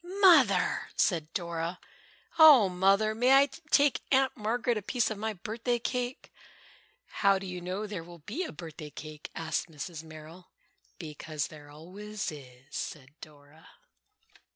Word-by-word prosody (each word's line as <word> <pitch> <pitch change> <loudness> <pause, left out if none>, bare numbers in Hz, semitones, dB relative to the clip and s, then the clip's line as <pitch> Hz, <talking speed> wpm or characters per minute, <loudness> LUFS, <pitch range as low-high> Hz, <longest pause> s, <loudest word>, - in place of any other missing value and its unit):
"Mother!" 345 - +4
said 165 -5 +1
Dora, 170 0 -3 0.6
"oh, 285 -11 +9
Mother, 195 +4 +2
may 245 +4 +3
I 275 +1 +7 0.2
take 285 -2 +4
Aunt 265 -1 +3
Margaret 235 +3 -1
a 215 - -2
piece 235 +3 0
of 210 - -5
my 220 +1 -2
birthday 230 +5 -2
cake?" 245 +1 -4 0.7
"How 195 -1 +2
do 195 - -7
you 180 -1 -6
know 185 +4 -4
there 200 -5 -6
will 170 -2 -14
be 280 - -3
a - - -6
birthday 155 -1 -9
cake?" 155 +1 -9
asked 165 +1 -2
Mrs. 160 +1 -7
Merrill. 160 +3 -12 0.5
"Because 155 -2 -5
there 150 -1 -13
always 190 +7 -6
is," 130 -4 -13
said 140 -3 -6
Dora. 150 +1 -15
185 Hz, 145 wpm, -29 LUFS, 160-225 Hz, 0.7 s, oh